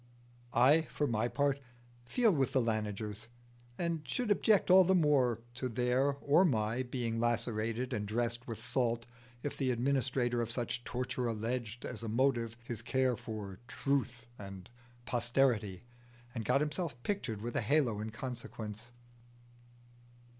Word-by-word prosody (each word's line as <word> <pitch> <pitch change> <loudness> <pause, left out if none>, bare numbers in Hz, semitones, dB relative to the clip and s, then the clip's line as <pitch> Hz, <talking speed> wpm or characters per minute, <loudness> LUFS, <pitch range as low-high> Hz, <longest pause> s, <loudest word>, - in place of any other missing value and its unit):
I 135 +7 +6
for 150 - 0
my 115 -3 +1
part 140 +3 +1 0.5
feel 230 - +3
with 135 -5 +1
the 135 - +4
Lanigers, 110 -1 -2 0.5
and 170 -2 -1
should 210 - -1
object 205 -2 +4
all 190 +1 +9
the 190 +1 +3
more 135 - +3
to 130 +1 -3
their 125 +4 +2
or 150 +6 +5
my 115 - +1
being 120 -3 -2
lacerated 120 +1 0
and 105 -3 -2
dressed 120 +2 -1
with 115 -2 -6
salt, 120 -2 0 0.4
if 145 - -3
the 135 -2 0
administrator 125 -1 +1
of 115 - -2
such 120 0 -2
torture 125 0 -2
alleged 115 +1 -3
as 120 -3 -5
a 115 - -4
motive 120 -1 +1
his 120 -1 -5
care 130 +1 +1
for 105 -4 -7
Truth 130 -3 -1
and 95 0 -9 0.3
posterity, 120 -5 +1 0.5
and 115 -3 -4
got 135 - +3
himself 150 -1 -2
pictured 115 - -2
with 120 0 -4
a - - +2
halo 120 -2 +2
in 110 +1 -3
consequence. 115 -1 -7
120 Hz, 145 wpm, -33 LUFS, 115-135 Hz, 0.5 s, all